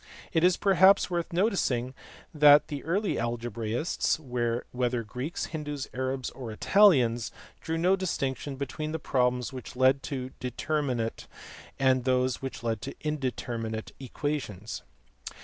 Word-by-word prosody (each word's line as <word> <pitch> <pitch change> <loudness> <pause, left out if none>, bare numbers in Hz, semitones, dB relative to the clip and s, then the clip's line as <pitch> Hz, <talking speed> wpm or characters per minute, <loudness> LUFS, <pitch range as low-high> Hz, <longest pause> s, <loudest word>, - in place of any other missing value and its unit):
It 165 -1 +2
is 180 0 +5
perhaps 195 -1 +5
worth 170 -1 -2
noticing 170 - +1 0.4
that 150 -1 +7
the 145 -2 -5
early 195 +5 0
algebraists, 120 +5 -1
whether 125 -2 -2
Greeks, 125 +9 -4
Hindoos, 150 -3 -4
Arabs, 130 0 -2
or 125 -4 -7
Italians, 125 - +4 0.3
drew 165 0 -2
no 180 +3 +3
distinction 140 -7 -2
between 150 +3 -4
the - - 0
problems 125 -4 0
which 130 -1 -8
led 130 +2 +4
to 130 -2 -4
determinate 125 -2 -2 0.5
and 130 -2 +3
those 130 0 +1
which 135 -3 -6
led 115 -2 -1
to - - -6
indeterminate 120 -6 -3
equations. 130 -6 -4
130 Hz, 125 wpm, -28 LUFS, 120-155 Hz, 0.5 s, that